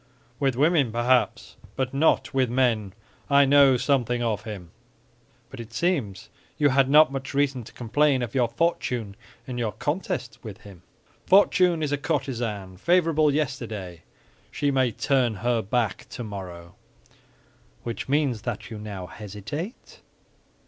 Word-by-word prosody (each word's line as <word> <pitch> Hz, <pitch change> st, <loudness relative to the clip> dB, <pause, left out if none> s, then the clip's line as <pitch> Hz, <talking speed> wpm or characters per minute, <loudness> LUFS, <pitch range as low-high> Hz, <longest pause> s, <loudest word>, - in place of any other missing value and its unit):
"With 135 Hz, -3 st, +1 dB
women, 145 Hz, -2 st, +3 dB
perhaps; 120 Hz, +2 st, +1 dB, 0.2 s
but 130 Hz, 0 st, -2 dB
not 145 Hz, +1 st, +2 dB
with 130 Hz, -2 st, +2 dB
men. 115 Hz, -6 st, +1 dB, 0.4 s
I 140 Hz, 0 st, +6 dB
know 135 Hz, -1 st, +6 dB
something 120 Hz, -3 st, 0 dB
of 110 Hz, -2 st, -2 dB
him." 95 Hz, -6 st, -8 dB, 0.8 s
"But -, -, -10 dB
it 115 Hz, -1 st, -9 dB
seems 130 Hz, -, -1 dB, 0.3 s
you 145 Hz, -1 st, +4 dB
had 135 Hz, 0 st, +3 dB
not 150 Hz, 0 st, +6 dB
much 135 Hz, 0 st, -5 dB
reason 140 Hz, -3 st, +1 dB
to -, -, -12 dB
complain 130 Hz, +2 st, +1 dB
of 120 Hz, -, -5 dB
your 125 Hz, -3 st, +2 dB
fortune 120 Hz, -6 st, -1 dB, 0.3 s
in 125 Hz, -2 st, -5 dB
your 110 Hz, -4 st, -1 dB
contest 150 Hz, -, -3 dB
with 110 Hz, -2 st, -9 dB
him." 100 Hz, -4 st, -14 dB, 0.5 s
"Fortune 180 Hz, -4 st, +4 dB
is 145 Hz, -, -1 dB
a 145 Hz, -, 0 dB
courtesan; 120 Hz, -, -3 dB
favorable 160 Hz, -, +3 dB
yesterday, 110 Hz, -, -3 dB, 0.5 s
she 145 Hz, -1 st, -1 dB
may 130 Hz, -3 st, +2 dB
turn 125 Hz, -1 st, +1 dB
her 120 Hz, +3 st, 0 dB
back 110 Hz, -1 st, -2 dB
tomorrow." 90 Hz, -6 st, -8 dB, 1.1 s
"Which 120 Hz, +2 st, -5 dB
means 140 Hz, -6 st, +1 dB
that 120 Hz, 0 st, -5 dB
you 110 Hz, -, -6 dB
now 100 Hz, -3 st, -6 dB
hesitate?" 105 Hz, -, -8 dB
125 Hz, 140 wpm, -25 LUFS, 110-145 Hz, 1.1 s, I